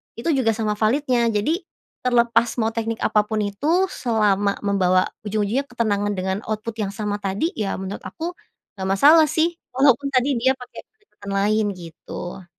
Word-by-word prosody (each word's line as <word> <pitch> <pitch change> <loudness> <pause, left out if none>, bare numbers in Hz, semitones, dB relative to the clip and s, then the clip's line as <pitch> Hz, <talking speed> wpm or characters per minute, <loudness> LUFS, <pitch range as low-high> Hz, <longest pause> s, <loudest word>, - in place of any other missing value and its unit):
itu 230 +8 -3
juga 225 -3 +2
sama 215 -2 -1
validnya 245 +1 +2
jadi, 210 +10 +1 0.5
terlepas 235 -1 +3
mau 220 - +2
teknik 230 0 -3
apa 210 -1 +2
pun 215 0 -1
itu 205 +8 -3 0.2
selama 205 -4 +1
membawa 185 -2 +2 0.2
ujung-ujungnya 215 +6 0
ketenangan 205 -4 -1
dengan 190 +1 -2
output 215 +1 -4
yang 200 -2 -2
sama 210 -1 -2
tadi 200 - -1
ya 205 -3 -1
menurut 190 +1 -5
aku, 335 +1 -5 0.5
nggak 190 0 -3
masalah 295 +12 +6
sih 330 +3 0 0.2
walaupun 275 +1 +3
tadi 260 0 +2
dia 260 +3 +3
pakai 250 -1 -11
pendekatan 310 - -12
lain 210 +2 +2
gitu. 175 +1 -9
220 Hz, 155 wpm, -22 LUFS, 200-250 Hz, 0.5 s, masalah